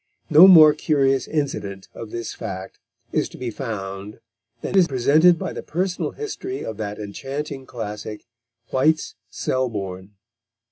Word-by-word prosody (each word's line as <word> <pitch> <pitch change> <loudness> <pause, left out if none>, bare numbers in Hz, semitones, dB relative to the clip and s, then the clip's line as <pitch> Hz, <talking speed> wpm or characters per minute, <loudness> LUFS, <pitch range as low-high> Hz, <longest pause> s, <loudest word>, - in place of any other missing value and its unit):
No 160 +5 +10
more 155 -5 +9
curious 135 -4 +1
incident 105 -11 -3
of 115 - -8
this 115 0 -5
fact 95 0 -7 0.3
is - - 0
to - - -12
be 125 -2 -4
found 105 -4 -6 0.4
than - - -4
is 185 -3 +6
presented 155 +6 +4
by - - -4
the - - -5
personal 180 +2 -2
history 395 -3 -5
of 110 - -5
that 105 -1 -4
enchanting 135 +6 -6
classic, 105 -2 -6 0.5
White's 155 +4 +2 0.2
Selborne. 100 -6 -3
130 Hz, 135 wpm, -22 LUFS, 105-155 Hz, 0.5 s, No